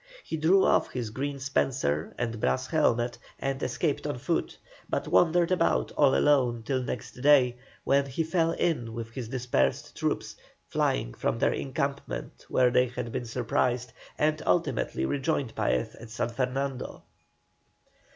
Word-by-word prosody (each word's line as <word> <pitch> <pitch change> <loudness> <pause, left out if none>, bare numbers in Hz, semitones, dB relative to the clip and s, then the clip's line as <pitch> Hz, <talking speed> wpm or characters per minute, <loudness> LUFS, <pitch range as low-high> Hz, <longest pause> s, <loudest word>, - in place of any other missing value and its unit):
He - - -4
threw 175 +5 +4
off - - +3
his 120 -4 -4
green 140 +4 -3
spencer 130 - 0
and 115 -2 -2
brass 65 -9 +1
helmet 120 0 +1 0.2
and 135 0 -2
escaped - - -1
on - - -2
foot, - - -2 0.3
but - - -1
wandered 175 +1 +4
about 175 -2 +2
all 140 -3 +4
alone 125 -6 +3
till 130 +2 0
next 125 0 -6
day, 130 -4 +5 0.3
when 140 0 +3
he 135 +5 -1
fell 165 0 +1
in 120 -12 -1
with 115 -1 -5
his 120 -1 -5
dispersed 120 - 0
troops, - - -2 0.3
flying - - 0
from - - -1
their - - +2
encampment 140 +1 -4
where 125 -1 +4
they 125 0 +4
had 125 -1 -5
been 120 - -3
surprised, 120 0 -1 0.2
and 155 +1 +1
ultimately 65 -6 +1
rejoined 140 - -1
Paez 65 - 0
at 115 - -12
San 115 +1 -2
Fernando. 130 +2 -3
125 Hz, 150 wpm, -28 LUFS, 115-140 Hz, 0.3 s, day